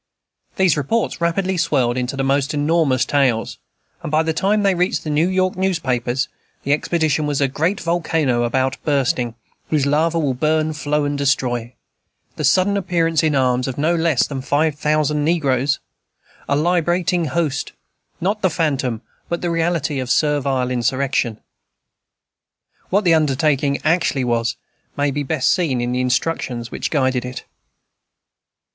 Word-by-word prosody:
These 185 Hz, -6 st, +3 dB
reports 170 Hz, -, -1 dB
rapidly 185 Hz, +2 st, 0 dB
swelled 135 Hz, -8 st, +1 dB
into 125 Hz, +2 st, -3 dB
the 135 Hz, -, 0 dB
most 140 Hz, +2 st, +1 dB
enormous 145 Hz, -4 st, +2 dB
tales, 130 Hz, -6 st, 0 dB, 0.4 s
and -, -, -5 dB
by 155 Hz, +1 st, +3 dB
the 160 Hz, 0 st, -1 dB
time 200 Hz, +5 st, +1 dB
they 195 Hz, -1 st, +3 dB
reached 180 Hz, +1 st, 0 dB
the 155 Hz, -, -3 dB
New 155 Hz, +4 st, +2 dB
York 185 Hz, 0 st, +1 dB
newspapers, 130 Hz, -9 st, -1 dB, 0.4 s
the 140 Hz, -, +2 dB
expedition 155 Hz, -1 st, 0 dB
was 145 Hz, -2 st, -1 dB
"a 140 Hz, -, +3 dB
great 165 Hz, +9 st, -1 dB
volcano 160 Hz, -7 st, 0 dB
about 130 Hz, +2 st, 0 dB
bursting, 130 Hz, -5 st, 0 dB, 0.3 s
whose 150 Hz, -3 st, +1 dB
lava 160 Hz, +4 st, +1 dB
will 145 Hz, -5 st, +1 dB
burn, 155 Hz, +4 st, 0 dB
flow, 150 Hz, 0 st, -1 dB
and 145 Hz, 0 st, -2 dB
destroy," 125 Hz, -4 st, 0 dB, 0.6 s
"the 155 Hz, -, -4 dB
sudden 185 Hz, +8 st, +3 dB
appearance 165 Hz, -4 st, +1 dB
in 155 Hz, -3 st, +1 dB
arms 125 Hz, -1 st, +1 dB
of 130 Hz, -, -4 dB
no 155 Hz, +4 st, +2 dB
less 165 Hz, -5 st, +2 dB
than 135 Hz, -2 st, -5 dB
five 150 Hz, +3 st, +1 dB
thousand 150 Hz, 0 st, 0 dB
negroes," 140 Hz, -4 st, +1 dB, 0.7 s
"a 140 Hz, -, +3 dB
liberating 175 Hz, +2 st, +1 dB
host," 150 Hz, -1 st, -2 dB, 0.5 s
"not 205 Hz, +4 st, -1 dB
the 185 Hz, -, +3 dB
phantom, 140 Hz, -9 st, -1 dB, 0.3 s
but 170 Hz, -, -2 dB
the 175 Hz, -, -1 dB
reality, 165 Hz, -4 st, 0 dB
of 130 Hz, -1 st, -4 dB
servile 135 Hz, -3 st, +1 dB
insurrection." 125 Hz, -1 st, 0 dB, 1.5 s
What 200 Hz, +3 st, +2 dB
the 170 Hz, -3 st, +4 dB
undertaking 145 Hz, -2 st, +2 dB
actually 155 Hz, -4 st, +1 dB
was 120 Hz, -1 st, 0 dB, 0.4 s
may 145 Hz, 0 st, +1 dB
be 145 Hz, +2 st, -2 dB
best 135 Hz, -1 st, +1 dB
seen 160 Hz, -10 st, +1 dB
in 120 Hz, 0 st, -1 dB
the 125 Hz, +1 st, 0 dB
instructions 125 Hz, -2 st, -1 dB
which -, -, -3 dB
guided 130 Hz, -4 st, +1 dB
it. 125 Hz, 0 st, -7 dB
145 Hz, 150 wpm, -20 LUFS, 130-165 Hz, 1.5 s, the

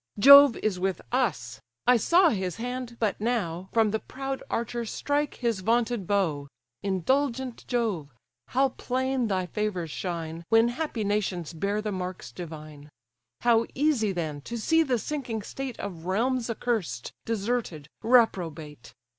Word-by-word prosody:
Jove 280 Hz, +3 st, +9 dB
is 200 Hz, -4 st, 0 dB
with 190 Hz, 0 st, -1 dB
us; 125 Hz, -, -1 dB, 0.2 s
I 250 Hz, -, +6 dB
saw 340 Hz, -, +5 dB
his 190 Hz, -6 st, -2 dB
hand, 245 Hz, 0 st, -5 dB
but 210 Hz, -3 st, -1 dB
now, 190 Hz, -6 st, -1 dB
From 225 Hz, -2 st, +3 dB
the 220 Hz, -, 0 dB
proud 270 Hz, +2 st, -5 dB
archer 235 Hz, +1 st, -2 dB
strike 290 Hz, +6 st, -1 dB
his 235 Hz, -5 st, -1 dB
vaunted 230 Hz, 0 st, 0 dB
bow: 165 Hz, -9 st, 0 dB, 0.3 s
Indulgent 250 Hz, -, -1 dB
Jove! 210 Hz, -, -1 dB, 0.4 s
how 270 Hz, +2 st, +2 dB
plain 260 Hz, 0 st, -1 dB
thy 190 Hz, -3 st, 0 dB
favours 180 Hz, -4 st, -3 dB
shine, 165 Hz, -2 st, -4 dB
When 225 Hz, +1 st, +5 dB
happy 245 Hz, -3 st, -3 dB
nations 195 Hz, -5 st, -1 dB
bear 200 Hz, +6 st, -1 dB
the 210 Hz, -, -2 dB
marks 180 Hz, -8 st, -5 dB
divine! 155 Hz, -1 st, -9 dB, 0.5 s
How 230 Hz, -1 st, +3 dB
easy 265 Hz, -7 st, +2 dB
then, 155 Hz, -5 st, -3 dB
to 235 Hz, +10 st, -6 dB
see 325 Hz, +8 st, +3 dB
the 265 Hz, -6 st, +1 dB
sinking 240 Hz, -4 st, -4 dB
state 265 Hz, +2 st, -6 dB
Of 175 Hz, -4 st, -6 dB
realms 240 Hz, +5 st, 0 dB
accursed, 215 Hz, -, -2 dB
deserted, 220 Hz, -9 st, -2 dB
reprobate! 165 Hz, -, +1 dB
220 Hz, 140 wpm, -27 LUFS, 180-245 Hz, 0.5 s, Jove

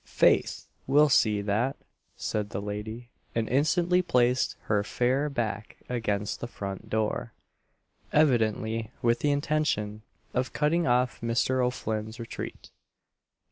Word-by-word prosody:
"'Faith, -, -, +2 dB, 0.2 s
we'll 145 Hz, +3 st, +5 dB
see 105 Hz, -6 st, +3 dB
that," 110 Hz, +7 st, 0 dB, 0.4 s
said 105 Hz, -1 st, -2 dB
the -, -, -3 dB
lady, 105 Hz, +4 st, -6 dB, 0.2 s
and 115 Hz, -1 st, 0 dB
instantly 170 Hz, +6 st, +3 dB
placed 125 Hz, -7 st, +2 dB
her 105 Hz, -1 st, +1 dB
fair 130 Hz, +7 st, +1 dB
back 110 Hz, -6 st, -3 dB
against 105 Hz, -4 st, -1 dB
the 120 Hz, -, -4 dB
front 100 Hz, -4 st, -6 dB
door, 110 Hz, +1 st, -1 dB, 0.8 s
evidently 115 Hz, -6 st, +2 dB
with 120 Hz, 0 st, +3 dB
the 145 Hz, -, +1 dB
intention 145 Hz, -8 st, 0 dB, 0.3 s
of 130 Hz, +1 st, -1 dB
cutting 165 Hz, +2 st, +2 dB
off 125 Hz, +1 st, +2 dB
Mr. 125 Hz, +2 st, +1 dB
O'Flinn's 110 Hz, -3 st, -2 dB
retreat. 115 Hz, -, -7 dB
120 Hz, 120 wpm, -28 LUFS, 110-135 Hz, 0.8 s, we'll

